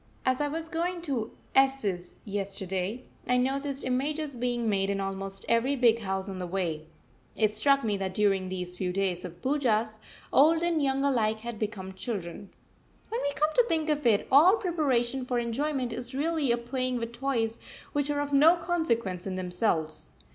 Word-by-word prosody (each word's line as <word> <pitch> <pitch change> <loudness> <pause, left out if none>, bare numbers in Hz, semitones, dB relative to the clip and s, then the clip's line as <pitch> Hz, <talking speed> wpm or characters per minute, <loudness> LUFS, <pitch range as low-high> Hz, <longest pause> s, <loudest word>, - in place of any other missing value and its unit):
As 255 +2 +2
I 295 - +1
was 320 +2 -4
going 340 +1 -2
to 250 -8 -2 0.2
S 270 -2 +4
's 180 -3 -3
yesterday, 195 +2 -3 0.2
I 250 - +3
noticed 275 +2 0
images 285 +3 -1
being 240 -1 -1
made 195 -2 +1
in 200 0 -1
almost 195 0 -4
every 235 +4 +2
big 235 -3 +4
house 190 -2 -2
on 190 -1 -5
the 180 - -3
way. 170 -4 -2 0.5
It 215 -1 +2
struck 275 +5 +4
me 210 -3 0
that 190 -1 -3
during 195 -3 +2
these 180 -1 -4
few 180 0 -2
days 185 -2 -1
of 175 -2 -7
the - - -4
Poojahs, 225 -6 +1 0.3
old 320 +4 +5
and 340 -2 +1
young 270 -1 +1
alike 220 -6 +1
had 235 -2 -6
become 195 -3 -4
children. 190 -2 -5 0.6
When 465 +3 -2
we 285 - 0
come 305 +2 +1
to - - +5
think 315 -1 0
of 295 -4 +1
it, 210 -3 +3
all 320 +9 +7
preparation 270 - 0
for 250 -1 -1
enjoyment 250 +1 -1
is 245 +2 -6
really 300 -2 +1
a 235 - +2
playing 255 +1 -2
with 230 -1 -4
toys 235 -3 -1 0.3
which 290 0 0
are 290 0 0
of 285 0 -4
no 310 +5 +7
consequence 235 - -1
in 190 - -3
themselves. 180 -4 -1
235 Hz, 185 wpm, -28 LUFS, 195-280 Hz, 0.6 s, all